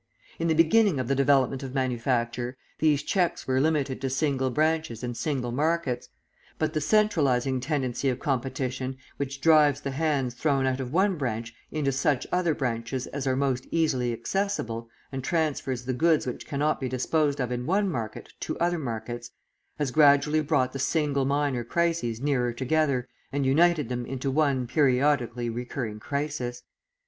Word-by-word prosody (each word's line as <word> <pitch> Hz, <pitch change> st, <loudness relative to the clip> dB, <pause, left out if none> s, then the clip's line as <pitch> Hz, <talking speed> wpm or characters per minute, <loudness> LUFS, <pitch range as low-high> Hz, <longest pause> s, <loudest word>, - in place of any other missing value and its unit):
In 165 Hz, -, 0 dB
the 160 Hz, -, +2 dB
beginning 165 Hz, +1 st, +4 dB
of 130 Hz, -, -2 dB
the 135 Hz, -, +2 dB
development 135 Hz, -1 st, +3 dB
of 135 Hz, 0 st, -6 dB
manufacture, 125 Hz, -1 st, -1 dB, 0.2 s
these 150 Hz, -2 st, +3 dB
checks 180 Hz, 0 st, 0 dB
were 130 Hz, 0 st, +1 dB
limited 145 Hz, -4 st, 0 dB
to 135 Hz, -, -1 dB
single 135 Hz, -1 st, 0 dB
branches 155 Hz, -3 st, 0 dB
and 120 Hz, -1 st, -3 dB
single 130 Hz, -3 st, -2 dB
markets; 150 Hz, -1 st, -1 dB, 0.5 s
but 155 Hz, 0 st, -1 dB
the 155 Hz, -, 0 dB
centralising 140 Hz, -, +2 dB
tendency 135 Hz, -1 st, -1 dB
of 125 Hz, -, -1 dB
competition 130 Hz, -1 st, -2 dB, 0.2 s
which 140 Hz, -1 st, -4 dB
drives 150 Hz, -2 st, +5 dB
the 140 Hz, -, -3 dB
hands 140 Hz, -4 st, 0 dB
thrown 135 Hz, +1 st, +1 dB
out 130 Hz, 0 st, 0 dB
of 130 Hz, -2 st, -4 dB
one 190 Hz, +3 st, +2 dB
branch 115 Hz, -3 st, -3 dB, 0.2 s
into 145 Hz, -3 st, 0 dB
such 135 Hz, 0 st, +1 dB
other 175 Hz, -3 st, +1 dB
branches 120 Hz, 0 st, -2 dB
as 140 Hz, -1 st, -4 dB
are 130 Hz, -, +2 dB
most 130 Hz, -2 st, 0 dB
easily 130 Hz, -7 st, +1 dB
accessible, 115 Hz, -, -2 dB, 0.2 s
and 135 Hz, -1 st, -4 dB
transfers 140 Hz, -6 st, -1 dB
the 130 Hz, -, -1 dB
goods 160 Hz, +4 st, +3 dB
which 125 Hz, -, -5 dB
cannot 150 Hz, +2 st, 0 dB
be 130 Hz, -, -2 dB
disposed 145 Hz, +3 st, 0 dB
of 125 Hz, -2 st, -1 dB
in 125 Hz, +1 st, -3 dB
one 200 Hz, +4 st, +2 dB
market 115 Hz, -, -5 dB
to -, -, -4 dB
other 175 Hz, 0 st, +1 dB
markets, 120 Hz, -2 st, -5 dB, 0.5 s
has 145 Hz, -4 st, -1 dB
gradually 150 Hz, +1 st, +5 dB
brought 140 Hz, -4 st, +1 dB
the 135 Hz, -, -4 dB
single 140 Hz, -1 st, +1 dB
minor 140 Hz, -3 st, 0 dB
crises 165 Hz, -4 st, 0 dB
nearer 130 Hz, -3 st, +1 dB
together 130 Hz, 0 st, 0 dB, 0.2 s
and 140 Hz, 0 st, 0 dB
united 155 Hz, +1 st, +3 dB
them 125 Hz, 0 st, -3 dB
into 135 Hz, +1 st, -2 dB
one 140 Hz, -3 st, +2 dB
periodically 125 Hz, -3 st, +2 dB
recurring 120 Hz, -2 st, -4 dB
crisis. 140 Hz, -2 st, -3 dB
135 Hz, 165 wpm, -27 LUFS, 125-155 Hz, 0.5 s, drives